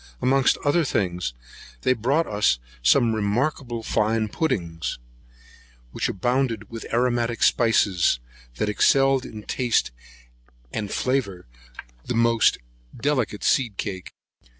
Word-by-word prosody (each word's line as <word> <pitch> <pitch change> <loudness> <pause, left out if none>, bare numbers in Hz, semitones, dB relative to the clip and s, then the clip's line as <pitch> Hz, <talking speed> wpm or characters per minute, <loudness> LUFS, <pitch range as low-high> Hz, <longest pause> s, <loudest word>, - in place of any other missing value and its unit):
Amongst 135 +1 +3
other 165 +4 +3
things, 90 - -2 0.5
they 130 - +3
brought 135 +8 +1
us 105 -11 +1 0.2
some 115 - +4
most - - -1
remarkable 120 +2 -1
fine 110 0 0
puddings, 85 - -2 0.9
which - - -2
abounded 120 +1 -1
with 115 -1 -7
aromatic 120 -1 0
spiceries, 100 - +3 0.4
that 105 - -1
excelled 135 +5 +3
in 105 -1 -9
taste 120 - 0 0.8
and 105 -2 -3
flavour 120 -10 -1 0.6
the - - -3
most 115 0 +3 0.4
delicate 130 -6 -1
seed 115 -7 +1
cake. 95 -3 -5
115 Hz, 110 wpm, -24 LUFS, 105-130 Hz, 0.9 s, some